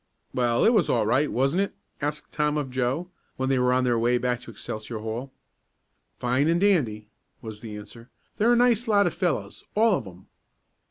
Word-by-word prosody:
"Well, 120 Hz, -2 st, +2 dB
it 230 Hz, -, +5 dB
was 200 Hz, -8 st, +3 dB
all 115 Hz, -3 st, +2 dB
right; 135 Hz, +7 st, +2 dB
wasn't 135 Hz, +9 st, +1 dB
it?" 200 Hz, -, -2 dB, 0.3 s
asked 150 Hz, +1 st, -3 dB
Tom 150 Hz, 0 st, 0 dB
of 140 Hz, -3 st, -3 dB
Joe, 130 Hz, +8 st, -1 dB, 0.3 s
when 130 Hz, 0 st, -1 dB
they 135 Hz, -1 st, +2 dB
were 125 Hz, 0 st, +3 dB
on 130 Hz, 0 st, +2 dB
their 120 Hz, -2 st, +2 dB
way 120 Hz, +2 st, +2 dB
back 125 Hz, 0 st, -1 dB
to 125 Hz, -, -12 dB
Excelsior 110 Hz, +1 st, -6 dB
Hall. 115 Hz, +5 st, -5 dB, 0.9 s
"Fine 125 Hz, +4 st, +1 dB
and 170 Hz, +1 st, +3 dB
dandy," 130 Hz, -, +1 dB, 0.4 s
was 110 Hz, -2 st, -7 dB
the 110 Hz, -2 st, -8 dB
answer. 115 Hz, +4 st, -11 dB, 0.3 s
"They're 230 Hz, +3 st, +4 dB
a -, -, +5 dB
nice 240 Hz, -1 st, +3 dB
lot 205 Hz, -2 st, +4 dB
of -, -, 0 dB
fellows -, -, -2 dB
all 220 Hz, -1 st, +4 dB
of 110 Hz, -, -10 dB
'em." 90 Hz, 0 st, -13 dB
130 Hz, 200 wpm, -26 LUFS, 115-165 Hz, 0.9 s, it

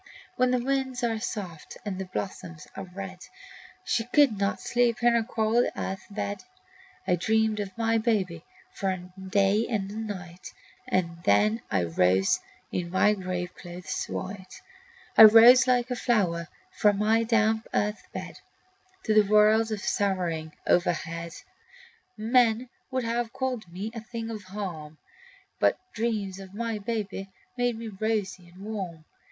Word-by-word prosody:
When 255 Hz, 0 st, +3 dB
the 250 Hz, -, +2 dB
winds 260 Hz, 0 st, -1 dB
are 225 Hz, -2 st, 0 dB
soft 180 Hz, -8 st, -6 dB
and 195 Hz, -2 st, -3 dB
the 190 Hz, -, -3 dB
blossoms 170 Hz, -4 st, -6 dB
are 195 Hz, -, -6 dB
red 190 Hz, 0 st, -8 dB, 0.6 s
She 225 Hz, -, 0 dB
could 275 Hz, -2 st, +4 dB
not 200 Hz, 0 st, 0 dB
sleep 240 Hz, -1 st, +1 dB
in 240 Hz, 0 st, +5 dB
her 235 Hz, -, +3 dB
cold 225 Hz, +1 st, +1 dB
earth 190 Hz, 0 st, -4 dB
bed. 205 Hz, 0 st, -4 dB, 0.6 s
I 180 Hz, -, +4 dB
dreamed 220 Hz, +3 st, +1 dB
of 200 Hz, -1 st, -5 dB
my 225 Hz, 0 st, +2 dB
babe 195 Hz, -7 st, 0 dB, 0.3 s
for 195 Hz, -, -2 dB
a 185 Hz, -, -1 dB, 0.2 s
day 195 Hz, +3 st, +2 dB
and 200 Hz, -4 st, -2 dB
a -, -, -8 dB
night, 190 Hz, -5 st, -7 dB, 0.3 s
And 170 Hz, -2 st, -1 dB
then 105 Hz, +2 st, +3 dB
I 95 Hz, -4 st, +1 dB
rose 90 Hz, +3 st, +2 dB, 0.3 s
in 175 Hz, -1 st, -2 dB
my 190 Hz, +3 st, +4 dB
graveclothes 180 Hz, -2 st, -5 dB
white. 185 Hz, -1 st, -6 dB, 0.5 s
I 220 Hz, -, +11 dB
rose 235 Hz, +4 st, +8 dB
like 250 Hz, 0 st, +2 dB
a -, -, 0 dB
flower 180 Hz, -9 st, +1 dB, 0.2 s
from 210 Hz, -, +3 dB
my 220 Hz, +2 st, +3 dB
damp 225 Hz, -1 st, +2 dB
earth 210 Hz, +1 st, 0 dB
bed -, -, -7 dB, 0.6 s
To 220 Hz, -, +1 dB
the 210 Hz, -2 st, +4 dB
world 215 Hz, +1 st, +5 dB
of 210 Hz, -2 st, -3 dB
sorrowing 175 Hz, -6 st, -1 dB
overhead. 170 Hz, -1 st, 0 dB, 0.8 s
Men 235 Hz, +1 st, +2 dB, 0.2 s
would 260 Hz, -1 st, -1 dB
have 230 Hz, 0 st, -2 dB
called 250 Hz, -8 st, -3 dB
me 195 Hz, +5 st, -5 dB
a 230 Hz, -, -6 dB
thing 230 Hz, 0 st, -6 dB
of 215 Hz, -3 st, -7 dB
harm, 175 Hz, -6 st, -6 dB, 0.6 s
But -, -, +3 dB, 0.2 s
dreams 210 Hz, -4 st, -2 dB
of 190 Hz, 0 st, -11 dB
my 230 Hz, -1 st, -2 dB
babe 205 Hz, -3 st, -4 dB, 0.3 s
made 245 Hz, -2 st, 0 dB
me 230 Hz, 0 st, -6 dB
rosy 200 Hz, -3 st, -2 dB
and 185 Hz, +3 st, -13 dB
warm. 185 Hz, -7 st, -5 dB
210 Hz, 150 wpm, -27 LUFS, 185-225 Hz, 0.8 s, I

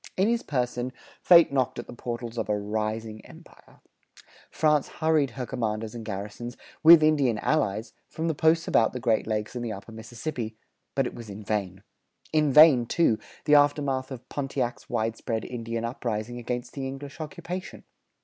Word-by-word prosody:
In 190 Hz, +2 st, +3 dB
his 235 Hz, 0 st, +1 dB
person 125 Hz, -2 st, -2 dB, 0.3 s
fate 170 Hz, -5 st, +7 dB
knocked 130 Hz, -3 st, 0 dB
at 120 Hz, -, -5 dB
the -, -, -10 dB
portals 120 Hz, -1 st, -5 dB
of 110 Hz, -, -3 dB
a 105 Hz, -, +2 dB
"rising 110 Hz, +1 st, -3 dB
empire." -, -, -17 dB, 0.7 s
France 150 Hz, -2 st, +2 dB
hurried 155 Hz, -4 st, +1 dB
her 125 Hz, -, -2 dB
commanders 110 Hz, -2 st, -3 dB
and 115 Hz, -1 st, -7 dB
garrisons, 105 Hz, +3 st, -6 dB, 0.2 s
with 165 Hz, 0 st, +9 dB
Indian 140 Hz, -7 st, +3 dB
allies, 110 Hz, -5 st, 0 dB, 0.2 s
from 160 Hz, +1 st, -3 dB
the 165 Hz, -, +1 dB
posts 160 Hz, +2 st, +2 dB
about 110 Hz, -, +3 dB
the 125 Hz, -, -4 dB
Great 115 Hz, -4 st, +1 dB
Lakes 105 Hz, +1 st, -2 dB
and 120 Hz, -, -3 dB
the 115 Hz, -, -3 dB
upper 100 Hz, +3 st, -10 dB
Mississippi; 115 Hz, +1 st, -6 dB, 0.4 s
but -, -, +2 dB
it -, -, -4 dB
was 115 Hz, -2 st, -9 dB
in 100 Hz, +1 st, -8 dB
vain. 100 Hz, -3 st, -3 dB, 0.5 s
In 155 Hz, -2 st, +3 dB
vain, 140 Hz, -5 st, +7 dB
too, 115 Hz, -9 st, +2 dB, 0.3 s
the 150 Hz, -, +3 dB
aftermath 145 Hz, -2 st, +3 dB
of 130 Hz, -3 st, -9 dB
Pontiac's 135 Hz, -3 st, -3 dB
widespread 110 Hz, 0 st, -2 dB
Indian 115 Hz, -1 st, -4 dB
uprising 115 Hz, -1 st, -3 dB
against 120 Hz, +1 st, -4 dB
the 135 Hz, -1 st, -4 dB
English 140 Hz, +3 st, -8 dB
occupation. 180 Hz, +3 st, -6 dB
120 Hz, 170 wpm, -27 LUFS, 110-145 Hz, 0.7 s, with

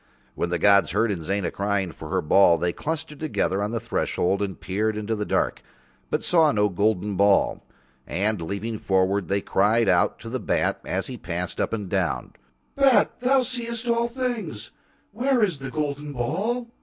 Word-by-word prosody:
When 85 Hz, -, -2 dB
the 85 Hz, -, 0 dB
gods 100 Hz, +3 st, +4 dB
heard 115 Hz, -1 st, +2 dB
Inzana 95 Hz, 0 st, -2 dB
crying 100 Hz, -2 st, -1 dB
for -, -, -10 dB
her -, -, 0 dB
ball 85 Hz, +2 st, +5 dB
They 85 Hz, 0 st, -1 dB
clustered 155 Hz, -1 st, -4 dB
together 125 Hz, -10 st, -1 dB
on 105 Hz, -, -1 dB
the 115 Hz, +1 st, -2 dB
threshold 100 Hz, -2 st, -1 dB
and 95 Hz, -2 st, -3 dB
peered 105 Hz, +3 st, -1 dB
into 105 Hz, +1 st, -2 dB
the 105 Hz, -1 st, -3 dB
dark, -, -, 0 dB, 0.5 s
but -, -, -1 dB
saw 165 Hz, -4 st, +4 dB
no 105 Hz, -3 st, +2 dB
golden 100 Hz, +1 st, 0 dB
ball. 100 Hz, +1 st, +3 dB, 0.5 s
And 100 Hz, +1 st, -1 dB
leaning 100 Hz, +6 st, -4 dB
forward 95 Hz, 0 st, +1 dB
They 100 Hz, +1 st, 0 dB
cried 110 Hz, +4 st, +2 dB
out 90 Hz, -2 st, +3 dB
to 115 Hz, -, -7 dB
the 130 Hz, +2 st, -3 dB
bat -, -, 0 dB
as -, -, -2 dB
he -, -, -6 dB
passed -, -, -4 dB
up -, -, -1 dB
and 105 Hz, -3 st, -3 dB
down: 90 Hz, -5 st, -1 dB, 0.4 s
"Bat 275 Hz, -3 st, +4 dB
that 255 Hz, +1 st, +3 dB
seest 235 Hz, -2 st, -4 dB
all 235 Hz, 0 st, +2 dB
things, 235 Hz, -, -4 dB, 0.4 s
where 245 Hz, +2 st, +1 dB
is 180 Hz, -9 st, 0 dB
the 135 Hz, 0 st, -6 dB
golden 145 Hz, +1 st, -3 dB
ball?" 215 Hz, -, -2 dB
110 Hz, 180 wpm, -24 LUFS, 100-165 Hz, 0.5 s, ball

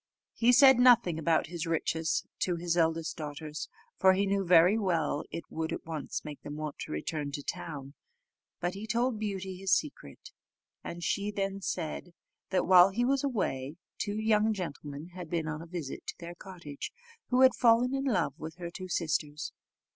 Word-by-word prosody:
He 240 Hz, +1 st, +4 dB
said 265 Hz, 0 st, +7 dB
nothing 235 Hz, -10 st, +5 dB
about 160 Hz, 0 st, +2 dB
his 170 Hz, -1 st, -5 dB
riches 160 Hz, 0 st, 0 dB
to 180 Hz, -, 0 dB
his 170 Hz, 0 st, -1 dB
eldest 165 Hz, -1 st, +1 dB
daughters, 150 Hz, 0 st, -6 dB, 0.3 s
for 190 Hz, 0 st, +6 dB
he 195 Hz, +2 st, +1 dB
knew 195 Hz, 0 st, +1 dB
very 180 Hz, +2 st, +6 dB
well 170 Hz, -9 st, 0 dB
it 165 Hz, -, -5 dB
would 160 Hz, 0 st, -3 dB
at -, -, -5 dB
once 160 Hz, -3 st, -5 dB
make 150 Hz, -2 st, -8 dB
them 145 Hz, -, -7 dB
want 155 Hz, -1 st, -5 dB
to -, -, -6 dB
return 145 Hz, -, -3 dB
to 145 Hz, -1 st, -4 dB
town; 140 Hz, -4 st, -6 dB, 0.7 s
but 175 Hz, +1 st, -1 dB
he 205 Hz, +3 st, -7 dB
told 235 Hz, 0 st, 0 dB
Beauty 190 Hz, -3 st, -4 dB
his 190 Hz, 0 st, -2 dB
secret, 300 Hz, -, -1 dB, 0.5 s
and 170 Hz, 0 st, -6 dB
she 200 Hz, +3 st, 0 dB
then 195 Hz, -1 st, -2 dB
said, 170 Hz, -1 st, -4 dB, 0.3 s
that 185 Hz, -1 st, +1 dB
while 180 Hz, 0 st, +8 dB
he 235 Hz, +5 st, 0 dB
was 275 Hz, +1 st, +1 dB
away, 160 Hz, -, -2 dB, 0.2 s
two 210 Hz, 0 st, -2 dB, 0.3 s
gentlemen 150 Hz, -4 st, -6 dB
had 180 Hz, -3 st, -8 dB
been 165 Hz, -2 st, -1 dB
on 155 Hz, 0 st, -4 dB
a 165 Hz, -, -9 dB
visit 165 Hz, -5 st, -5 dB
at -, -, -27 dB
their 170 Hz, 0 st, -7 dB
cottage, 175 Hz, -6 st, -8 dB, 0.4 s
who 250 Hz, +1 st, +3 dB
had 260 Hz, -1 st, +7 dB
fallen 240 Hz, +2 st, +4 dB
in 270 Hz, 0 st, -1 dB
love 210 Hz, -11 st, +1 dB
with 160 Hz, +1 st, -7 dB
her 175 Hz, -1 st, -6 dB
two 185 Hz, +1 st, -7 dB
sisters. 155 Hz, -3 st, -2 dB
175 Hz, 180 wpm, -30 LUFS, 160-200 Hz, 0.7 s, while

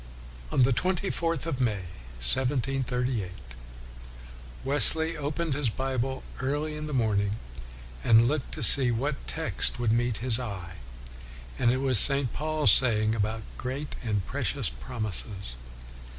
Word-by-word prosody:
On 130 Hz, -, +2 dB
the 130 Hz, +1 st, +2 dB
twenty 185 Hz, +7 st, -1 dB
fourth 165 Hz, -3 st, -3 dB
of 140 Hz, -6 st, -4 dB
May, 105 Hz, -6 st, -1 dB, 0.4 s
1738, 125 Hz, -, 0 dB, 1.4 s
Wesley 160 Hz, +4 st, +7 dB
opened 150 Hz, +1 st, -3 dB
his 135 Hz, -3 st, -1 dB
Bible 130 Hz, +2 st, -4 dB, 0.2 s
early 145 Hz, +3 st, -3 dB
in 150 Hz, 0 st, -6 dB
the -, -, -7 dB
morning, 105 Hz, -5 st, -1 dB, 0.7 s
and 115 Hz, +1 st, +4 dB
looked 145 Hz, 0 st, -3 dB
to -, -, -4 dB
see 135 Hz, -3 st, +7 dB
what 135 Hz, +5 st, -3 dB
text -, -, 0 dB
would 120 Hz, -2 st, 0 dB
meet 120 Hz, -1 st, 0 dB
his 120 Hz, 0 st, -1 dB
eye, 95 Hz, -8 st, -7 dB, 0.8 s
and 120 Hz, -, +2 dB
it 130 Hz, -, -1 dB
was 130 Hz, -5 st, +5 dB
St. 140 Hz, -1 st, +4 dB
Paul's 155 Hz, 0 st, +1 dB
saying 110 Hz, -4 st, +2 dB
about 110 Hz, 0 st, -3 dB
" -, -, -17 dB
great 135 Hz, +4 st, -6 dB
and 105 Hz, -5 st, -2 dB
precious -, -, -2 dB
prom 125 Hz, -3 st, -7 dB
ises.' 100 Hz, -, -5 dB
125 Hz, 140 wpm, -26 LUFS, 110-145 Hz, 1.4 s, Wesley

